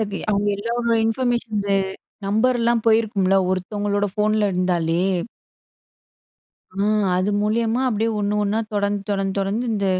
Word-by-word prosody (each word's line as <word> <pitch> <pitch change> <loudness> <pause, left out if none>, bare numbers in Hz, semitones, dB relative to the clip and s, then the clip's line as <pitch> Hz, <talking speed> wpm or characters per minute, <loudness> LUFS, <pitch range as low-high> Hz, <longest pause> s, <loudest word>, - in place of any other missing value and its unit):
அது 205 -2 -2
அவங்க 205 0 +1
எல்லாரோட 235 +2 -1
இன்ஃபர்மேஷன்ஸ்ல, 225 -4 -1 0.5
நம்பர்லாம் 235 +2 +2
போயிருக்கும்ல, 215 -4 +3 0.2
ஒருத்தவங்களோட 205 +2 -1
ஃபோன்ல 210 0 +2
இருந்தாலே? 175 -2 +1 1.8
ஆ - - 0 0.4
அது 190 +3 0
மூலியமா 225 +3 +1
அப்டியே 225 -1 0
1 205 0 0
1ணா, 205 +2 0
தொடர்ந்து, 205 0 0
தொடர்ந்து, 195 -1 -1
தொடர்ந்து 200 +5 -1
இந்த 200 -2 -1
210 Hz, 115 wpm, -22 LUFS, 200-225 Hz, 1.8 s, போயிருக்கும்ல